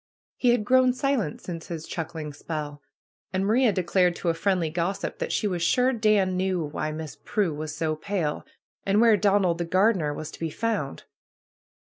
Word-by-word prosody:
He 250 - +2
had 240 -3 +2
grown 255 +1 +4
silent 255 - -1
since 165 -2 -7
his 165 -2 -5
chuck 165 -1 -5
ling 150 -2 -5
spell. 145 -1 -5 0.5
And 190 +1 0
Maria 230 +3 +4
declared 180 -1 +2
to 175 - -2
a - - +3
friendly 170 -1 0
gossip 180 +4 -2
that - - -2
she - - 0
was 180 -3 -2
sure 250 +9 +3
Dan 215 -5 +2
knew 185 -3 0
why 150 +1 -3
Miss 155 -1 -7
Pnie 200 -7 -1
was 155 0 -5
so 155 0 0
pale, 155 -2 -2 0.4
and 200 +1 +2
where 230 -1 +6
Donald 195 -4 +2
the 170 - -1
gardener 185 -3 +2
was 150 +1 -6
to - - -12
be 165 - -2
found. 210 -7 -2
180 Hz, 190 wpm, -26 LUFS, 160-210 Hz, 0.5 s, where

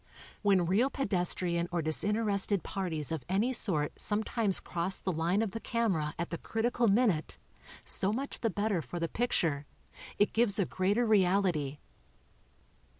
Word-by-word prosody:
When 195 -4 +3
real 210 +10 +2
pedestrian 180 -8 0
or 170 -2 -1
disinterested 200 +3 0
parties 165 -6 -3
of 160 -5 -3
any 210 +7 +1
sort 160 -11 0
sometimes 210 -1 +1
cross 175 +2 0
the 190 - -2
line 175 +6 +1
of 215 - -3
the 225 - -5
camera 190 -12 -1
at 170 - -4
the 170 - -4
critical 235 +1 0
min 220 +2 +4
ute, 155 -2 -4 0.5
so 195 - +1
much 270 +6 -3
the 230 - 0
better 205 -2 0
for 175 - -6
the 165 - -1
picture 160 - 0 0.2
— - - -15
it 205 - +2
gives 225 -3 +2
a 200 - +2
greater 200 +8 +1
reality. 185 -8 +2
195 Hz, 155 wpm, -31 LUFS, 170-220 Hz, 0.5 s, min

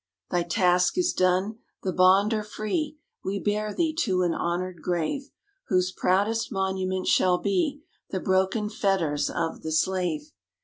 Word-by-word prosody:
_ - - -1
_Thy 175 -1 0
task 180 - +3
is 355 -1 +2
done; 185 +4 +1 0.2
the 185 - -1
bond 190 +4 +5
are 215 - 0
free: 215 +9 -3 0.3
We 195 +1 -2
bear 210 +1 -1
thee 320 +7 0
to 185 - +1
an 175 -2 +1
honoured 175 0 -2
grave, 180 - -2 0.4
Whose 185 -4 +2
proudest 205 +6 +1
monument 190 -2 -1
shall 180 -1 +4
be 240 - -1 0.3
The 190 - -2
broken 190 +4 +1
fetters 195 -9 0
of 165 -1 -3
the 160 - -4
slave. 190 - 0
190 Hz, 150 wpm, -26 LUFS, 180-215 Hz, 0.4 s, bond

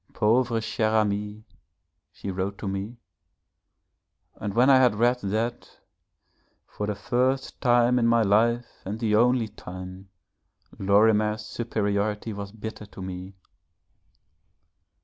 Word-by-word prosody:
'Pauvre 115 +2 +2
cher 110 0 0
Ami,' 105 0 -1 0.7
she 100 - -6
wrote 95 +2 -3
to 100 - -6
me, 100 +5 -4 1.4
and 105 0 -5
when 125 +2 +5
I 135 -1 +7
had 125 -4 +4
read 120 +3 +2
that, 115 +3 -3 0.9
for 105 - -5
the 105 - -2
first 130 +5 -1
time 120 0 +4
in 115 - +2
my 115 -1 +4
life 115 +4 +2 0.2
and 105 +4 -5
the 110 -2 +1
only 120 +1 +3
time 95 -1 -10 0.7
Lorimer's 105 +2 +3
superiority 105 -1 -2
was 100 -1 -7
bitter 110 -1 -8
to 100 - -11
me. 95 +1 -7
110 Hz, 120 wpm, -26 LUFS, 100-120 Hz, 1.4 s, I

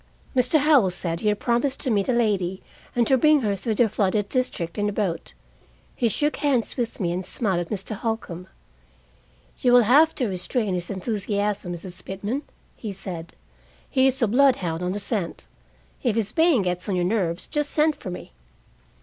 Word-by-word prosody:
Mr. 250 +4 +3
Howell 285 -9 +5
said 170 -2 -3
he 215 - -2
had 210 -1 +2
promised 255 +3 0
to 260 - 0
meet 200 0 +1
a - - +5
lady, 200 -6 0 0.3
and 240 -1 +3
to 265 +2 +3
bring 305 +1 +5
her 205 -4 0
through 215 +3 -1
the 235 +2 +4
flooded 205 -1 0
district 215 -9 -2
in 205 0 +1
a - - -2
boat. 195 -5 -3 0.6
He 240 - +1
shook 295 +7 0
hands 265 -6 +1
with 240 -3 -3
me, 175 -4 0
and 180 +2 -2
smiled 190 -1 -1
at 175 - -4
Mr. 210 +1 -3
Holcombe. 195 -5 -4 1.1
"You 245 -1 +3
will 245 -1 +8
have 295 +8 +5
to 255 - 0
restrain 200 +2 -1
his 180 -1 -3
enthusiasm, 200 -1 -2
Mrs. 175 +1 -8
Pitman," 205 +8 -3 0.3
he 215 - -6
said. 180 -4 -5 0.5
"He 265 -1 +3
is 265 0 0
a - - +4
bloodhound 210 -9 +2
on 180 +1 -1
the 205 - -3
scent. 200 -4 -3 0.6
If 240 -5 +1
his 215 -2 0
baying 320 - +3
gets 180 +1 -2
on 195 - +1
your 180 -1 +1
nerves, 180 -4 0
just 295 -1 -2
send 305 0 +2
for - - -8
me." 180 - -8
210 Hz, 190 wpm, -24 LUFS, 185-250 Hz, 1.1 s, will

